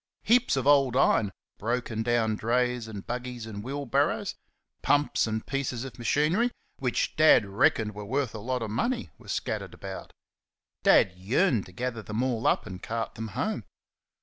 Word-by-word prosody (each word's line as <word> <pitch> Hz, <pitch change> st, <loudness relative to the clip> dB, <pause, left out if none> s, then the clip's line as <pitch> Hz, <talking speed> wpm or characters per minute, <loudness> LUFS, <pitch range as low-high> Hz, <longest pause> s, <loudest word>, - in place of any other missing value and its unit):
Heaps 240 Hz, -, +3 dB
of 135 Hz, -, -1 dB
old 135 Hz, -3 st, +4 dB
iron, 105 Hz, -6 st, +3 dB, 0.3 s
broken 115 Hz, 0 st, -2 dB
down 115 Hz, -2 st, +1 dB
drays 125 Hz, +1 st, 0 dB
and 105 Hz, -3 st, -7 dB
buggies 125 Hz, -1 st, -5 dB
and 105 Hz, -2 st, -7 dB
wheel 140 Hz, +3 st, -4 dB
barrows, 120 Hz, -, +1 dB, 0.5 s
pumps 145 Hz, -4 st, +2 dB
and 110 Hz, 0 st, -3 dB
pieces 130 Hz, -3 st, -2 dB
of 135 Hz, -2 st, -9 dB
machinery, 155 Hz, -, +2 dB, 0.3 s
which 125 Hz, -3 st, 0 dB
Dad 155 Hz, -8 st, +6 dB
reckoned 105 Hz, +1 st, +2 dB
were 105 Hz, +1 st, -7 dB
worth 130 Hz, +2 st, -1 dB
a 110 Hz, -, -6 dB
lot 125 Hz, +2 st, -2 dB
of 110 Hz, -, -4 dB
money, 130 Hz, -, -1 dB
were -, -, -16 dB
scattered -, -, -3 dB
about. -, -, -8 dB, 0.7 s
Dad 95 Hz, -, +5 dB
yearned 115 Hz, -, +1 dB
to -, -, -13 dB
gather 120 Hz, +3 st, -3 dB
them 110 Hz, +3 st, -2 dB
all 120 Hz, -3 st, 0 dB
up -, -, +2 dB
and 95 Hz, -3 st, -8 dB
cart 115 Hz, -1 st, -3 dB
them 110 Hz, 0 st, -5 dB
home. 105 Hz, -, -2 dB
120 Hz, 170 wpm, -28 LUFS, 110-135 Hz, 0.7 s, Dad